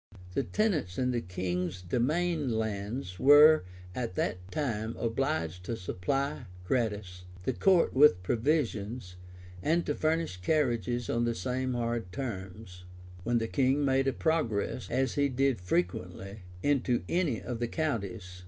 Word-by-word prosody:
The - - +1
tenants 160 - 0
in 125 0 +1
the 120 -1 -1
king's 90 -1 -3
demesne 150 - 0
lands 110 -2 -3
were 145 -2 +7 0.3
at 115 -5 -4
that 90 +1 -2
time 115 -6 -2
obliged 115 - -1
to 115 - -3
supply, 135 - -2 0.2
gratis, 100 -5 -2 0.2
the 130 - 0
court 185 +5 +3
with 130 -10 +6
provisions, 115 - -1 0.5
and 165 - +1
to 150 - 0
furnish 160 - 0
carriages 120 - 0
on 120 0 +1
the 120 -1 0
same 130 +5 -2
hard 115 -5 -2
terms, 95 -5 -6 0.4
when 120 +3 +1
the 115 -1 -1
king 135 +2 +2
made 135 0 +2
a 135 - +2
progress, 125 -8 -1
as 130 -2 0
he 140 -1 +2
did 130 -4 +1
frequently, 90 +2 -2 0.2
into 130 -6 +1
any 165 - 0
of 120 -2 -5
the 120 - 0
counties. 100 - -3
120 Hz, 140 wpm, -30 LUFS, 95-140 Hz, 0.5 s, were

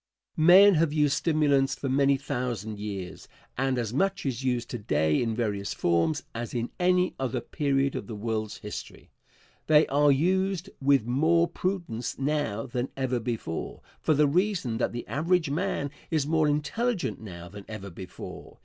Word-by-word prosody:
Answer. - - -2
Men 195 +3 +9
have 165 -2 +2
used 150 -2 +3
stimulants 145 -4 +2
for 140 - -4
many 140 +1 +3
thousand 120 -6 -4
years, 100 -4 -6 0.3
and 135 0 0
as 115 -2 -2
much 195 +6 0
is 130 -1 -2
used 125 -2 0
to 120 - -4
day 75 -6 +1
in 115 -2 -1
various 105 -4 -2
forms 85 - +1
as 120 +1 -5
in 120 0 -2
any 180 0 +3
other 130 -2 -1
period 140 -1 0
of - - -5
the 115 - -6
world's 110 0 -3
history. 105 - -8 0.6
They 155 0 +6
are 145 +1 +4
used 185 +5 +1
with 135 -4 +3
more 160 +7 +3
prudence 170 - -3
now 135 -6 -1
than 125 0 -3
ever 130 -2 0
before, 115 -8 -4 0.2
for 155 - +2
the 150 +1 +4
reason 170 - 0
that - - 0
the 120 0 -5
average 165 +1 +1
man 145 -3 -1 0.2
is 155 -4 +1
more 155 0 +2
intelligent 180 - -1
now 85 -5 -9
than 100 +2 -10
ever 100 -3 -7
before. 90 +1 -10
135 Hz, 165 wpm, -27 LUFS, 115-155 Hz, 0.6 s, Men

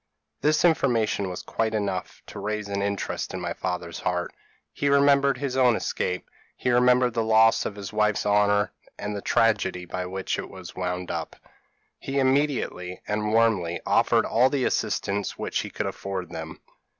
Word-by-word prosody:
p> - - +1
"This 155 +3 +3
information 115 - +2
was 90 - -6
quite 110 -1 -1
enough 100 -3 -3
to - - -9
raise 105 +1 -3
an 100 0 -2
interest 100 -1 -2
in - - -3
my 85 -1 -3
father's 90 -2 -4
heart, 90 -1 -2 0.4
he 145 - 0
remembered 140 -1 +4
his 135 -1 -3
own 125 -3 +4
escape; 90 -3 -2 0.3
he 125 - 0
remembered 125 0 +4
the 115 - 0
loss 110 0 +4
of 100 - -7
his 100 +2 -7
wife's 105 -1 +1
honour, 105 0 +3 0.3
and 105 0 -4
the 100 - -4
tragedy 105 -6 +1
by 90 +1 -4
which 95 +1 -3
it - - -6
was - - -10
wound 90 0 -3
up. - - -4 0.6
He 135 +1 -4
immediately, 130 -10 0
and 105 0 -1
warmly, 110 -7 +2
offered - - +3
all 125 +3 +3
the 135 -2 0
assistance 100 0 -1
which - - -2
he - - -4
could - - -3
afford 95 -3 -4
them. 80 0 -7
105 Hz, 175 wpm, -25 LUFS, 95-125 Hz, 0.6 s, remembered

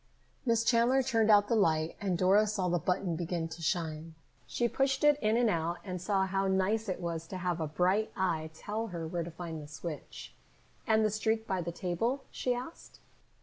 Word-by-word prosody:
'" - - -37
Miss 230 -1 +3
Chandler 240 +3 +3
turned 225 -4 +2
out 205 -1 +6
the - - 0
light 160 -6 +2
and 190 -4 0
Dora 195 +4 +4
saw 200 -3 -1
the 175 0 +1
button 180 0 -1
begin 170 0 -2
to 165 +1 -9
shine. 160 -1 -2 0.3
She 240 - 0
pushed 270 +2 0
it 295 -1 +5
in 215 +1 +2
and 240 -1 +3
out 170 -3 0
and 180 -3 -5
saw 195 0 +1
how 195 +1 0
nice 195 +3 +1
it 185 - -2
was 165 -2 -4
to 185 - -6
have 175 -2 -2
a 160 - -1
bright 185 +8 +1
eye 165 -5 -1
to 160 - -18
tell 220 +2 -3
her 170 -5 -5
where 170 +1 -2
to 170 - -5
find 165 -1 -6
the 145 - -10
switch. 150 +1 -8 0.5
"And 220 -1 +4
the 215 - +1
streak 220 +1 0
by 190 -4 -1
the 170 0 -4
table?" 190 +10 -2
she 250 - -1
asked. 250 +7 -6
190 Hz, 215 wpm, -31 LUFS, 170-220 Hz, 0.5 s, out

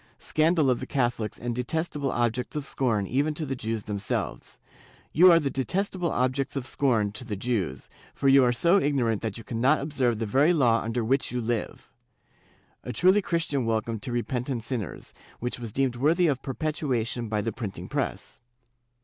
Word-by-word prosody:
Scandal 155 -3 +2
of 125 - 0
the - - -6
Catholics 120 -5 -1
and 120 0 -3
detestable 145 +2 -2
objects 120 +2 -1
of 150 -2 -2
scorn 115 -8 0
even 145 +8 0
to 155 - -3
the 135 -1 -3
Jews 115 -3 -3
themselves!.... 100 -2 -4 0.6
You 180 +3 +8
are 165 - +6
the 140 -4 -2
detestable 180 - -1
objects 130 +2 0
of 135 -3 -3
scorn 115 -8 +1
to 110 +4 -8
the 110 -4 -4
Jews, 100 - -2 0.3
for 140 - 0
you 135 0 +7
are 125 - +4
so 170 +10 +4
ignorant 125 -7 +1
that 110 -3 -3
you 115 - -9
cannot 125 +7 +2
observe 135 -6 0
the 115 - -2
very 140 +11 +3
law 120 -6 +3
under 115 +1 -2
which 135 +4 +1
you 125 - -2
live" 115 -1 -3 0.4
— - - -34
a 125 - -4
truly 185 - +4
Christian 165 -7 -1
welcome 115 0 -1
to 120 - -6
repen 120 +1 -1
tant 125 -5 -2
sinners, 115 - -5 0.3
which 125 +1 -4
was 115 -3 -6
deemed 130 +1 0
worthy 160 +7 +3
of 140 -5 +1
perpetuation 130 -5 -2
by 105 -1 0
the 115 - -2
printing 110 -6 -6
press. - - -3
125 Hz, 185 wpm, -27 LUFS, 115-145 Hz, 0.6 s, You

